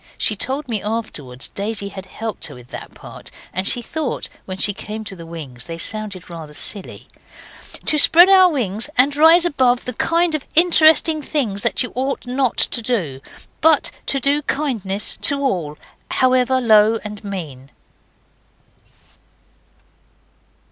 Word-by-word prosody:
She 215 - +1
told 270 +7 -3
me 220 -5 -3
afterwards 155 - -4
Daisy 200 0 -4
had 190 -1 -10
helped 220 +1 -4
her - - -11
with 125 -1 -15
that - - -10
part, - - -10 0.2
and 185 +2 -1
she 240 - 0
thought 305 +1 -3 0.2
when 185 -1 -6
she 205 +1 +3
came 215 +2 -7
to 200 - -4
the 165 -2 -11
wings 140 -7 -9
they 165 -1 -6
sounded 200 0 -5
rather 160 -3 -10
silly 200 +4 -6 0.8
'to 305 - +3
spread 345 +4 +8
our 380 -1 +6
wings 225 - -3
and 275 +3 +4
rise 325 +3 +6
above 255 -6 +1
the 250 - -3
kind 335 +6 +1
of 305 -3 -2
interesting 320 -1 +5
things 245 -10 -2
that - - 0
you 250 - -6
ought 265 +1 -3
not 255 0 -1
to 235 - +2
do, 180 - -2 0.4
but 315 0 +4 0.2
to 275 - 0
do 280 +3 +1
kindnesses 225 -10 -3
to 285 -4 +3
all, 170 - -2 0.3
however 255 0 +2
low 220 -2 +4
and 210 -1 -8
mean. 155 -10 -7
225 Hz, 150 wpm, -19 LUFS, 190-280 Hz, 0.8 s, spread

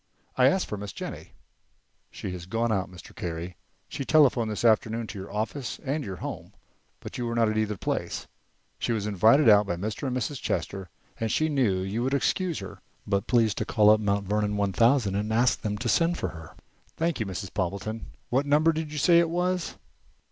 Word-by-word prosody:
"I 130 0 +5
asked 190 +7 +2
for 105 - -5
Miss 100 -2 -6
Jennie." - - -7 0.8
"She - - -6
has 90 -1 -7
gone 115 +3 0
out, 95 -3 0
Mr. 90 -1 -13
Carey. 85 +1 -5 0.3
She - - -5
telephoned 130 -6 +4
this 105 +2 -2
afternoon 115 +1 +2
to 105 -2 -7
your 95 - -8
office 115 +5 -3
and 145 +3 -1
your 95 -6 -5
home, - - -7 0.5
but - - -7
you 120 - -2
were 115 - -2
not 115 -2 +3
at 110 - -2
either 105 -1 -1
place. - - -3 0.5
She 120 - 0
was 105 -3 -2
invited 110 +8 +4
out 105 -1 +6
by 85 - -1
Mr. 105 - -4
and 130 -1 -1
Mrs. 130 +2 -3
Chester, 95 -2 -3 0.3
and 115 - -1
said - - +1
she 155 0 +1
knew 120 -11 +1
you 100 +5 -2
would 135 +3 +1
excuse 175 +4 0
her, 95 - -8 0.2
but 100 +1 -1
please 115 -4 +3
to - - -2
call 105 -1 +4
up 110 - +5
Mount 100 -1 0
Vernon 105 +1 0
one 100 -1 0
thousand 115 0 +3
and 105 +2 -1
ask 120 +3 +2
them 105 -2 -2
to 120 - -3
send 165 +10 +2
for - - -2
her." 80 -2 -11 0.4
"Thank 165 -2 0
you, 110 - -1
Mrs. 95 +1 -6
Poppleton. 100 +3 -3 0.2
What 135 +4 +1
number 150 +3 +4
did 155 -1 -4
you 150 - -5
say 170 +4 +5
it 170 -1 +2
was?" 180 +1 -1
110 Hz, 215 wpm, -27 LUFS, 100-135 Hz, 0.8 s, out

